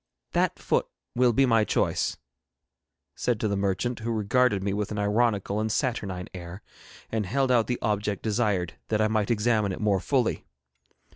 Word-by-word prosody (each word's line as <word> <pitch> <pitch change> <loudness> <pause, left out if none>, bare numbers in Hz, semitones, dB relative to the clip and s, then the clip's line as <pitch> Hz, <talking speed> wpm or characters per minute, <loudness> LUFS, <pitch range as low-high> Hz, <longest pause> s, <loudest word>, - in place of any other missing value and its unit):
'That - - +1
foot - - 0 0.3
will 125 0 +4
be 135 +4 +4
my 115 -3 +4
choice,' - - 0 1.0
said 120 -3 -1
to 110 - 0
the 100 - 0
merchant, 100 +5 -1
who 115 +1 -3
regarded 110 -1 +2
me 100 0 -1
with 105 0 -2
an 105 - -3
ironical 105 -1 +1
and 110 0 -1
saturnine 100 -8 -2
air, 90 +2 -8 0.5
and 110 -3 -1
held 135 +5 +1
out 120 -3 +3
the 125 - -1
object 105 -1 -1
desired 105 -6 0
that 110 - 0
I 110 - +3
might 110 -2 0
examine 110 -2 +2
it - - -5
more 105 -3 +2
fully. 90 - 0
105 Hz, 170 wpm, -27 LUFS, 100-115 Hz, 1.0 s, will